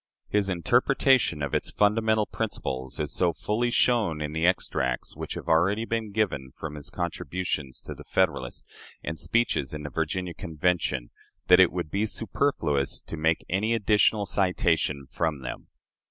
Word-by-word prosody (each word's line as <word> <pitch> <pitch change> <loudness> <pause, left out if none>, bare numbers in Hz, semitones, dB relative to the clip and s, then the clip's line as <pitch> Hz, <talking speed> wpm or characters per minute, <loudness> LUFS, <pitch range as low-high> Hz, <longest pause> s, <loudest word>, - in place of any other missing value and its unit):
His 100 -1 +1
interpretation 120 - +3
of 70 - -3
its - - 0
fundamental 110 +1 +2
principles 65 - -4
is 75 -1 -2
so 90 -2 +2
fully 115 +7 -1
shown 115 -10 +2
in 75 -1 -3
the 80 +2 +2
extracts 65 -8 0
which - - -5
have - - -7
already 95 +7 +3
been 115 -2 -2
given 95 -11 -1
from 80 -2 -5
his 75 -1 -7
contributions 85 -5 -3
to - - -6
the - - -12
"Federalist" 60 -1 0 0.4
and 80 0 -4
speeches 85 - 0
in 75 - -6
the 75 - -6
Virginia 85 +3 -2
Convention, 80 -6 -1 0.4
that 90 0 +8
it 95 - +6
would 85 -4 -4
be 105 +2 0
superfluous 95 - 0
to - - -7
make 80 +1 +1
any 105 +5 +1
additional 105 -1 +3
citation 85 -7 +1
from 75 +1 -2
them. - - -6
90 Hz, 155 wpm, -27 LUFS, 75-105 Hz, 0.4 s, that